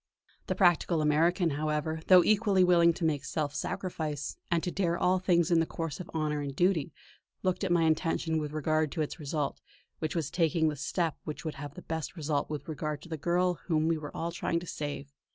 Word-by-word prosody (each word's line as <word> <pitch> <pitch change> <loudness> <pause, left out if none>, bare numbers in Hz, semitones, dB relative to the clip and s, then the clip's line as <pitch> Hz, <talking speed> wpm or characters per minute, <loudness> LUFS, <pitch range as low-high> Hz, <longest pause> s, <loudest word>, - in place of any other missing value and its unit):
The - - 0
practical 175 -2 +3
American, 165 +3 +3
however, 155 +2 -1
though 180 -2 +8
equally 205 -2 +3
willing 170 -1 +5
to 165 - -3
make 150 -3 0
self 145 +1 -2
sacrifice, 150 -5 -3
and 170 -1 +1
to 180 - -1
dare 175 -3 0
all 185 +2 +2
things 175 -2 +2
in 170 - +5
the 165 - +1
course 165 -3 -4
of 180 - -7
honour 150 -2 -1
and 140 -2 -5
duty, 175 -3 +2 0.5
looked 185 +1 0
at 190 - 0
my 170 -1 +4
intention 160 0 +1
with 150 -1 -4
regard 155 0 0
to 160 - -2
its 150 - -6
result; 150 -1 -3 0.4
was 155 +1 -3
I 160 -1 -2
taking 165 -2 +2
the 150 - -3
step 160 +3 -1
which 150 +1 -6
would 155 - -2
have 145 0 -7
the - - -10
best 160 +2 -4
result 150 -3 -1
with 150 -2 -5
regard 150 -1 -4
to 170 - -12
the 160 - -2
girl 175 +3 +1
whom 160 -2 +2
we 165 -1 +1
were 150 -1 -8
all 170 +1 -2
trying 170 0 -1
to - - -8
save. 145 -3 -5
160 Hz, 215 wpm, -30 LUFS, 150-175 Hz, 0.5 s, though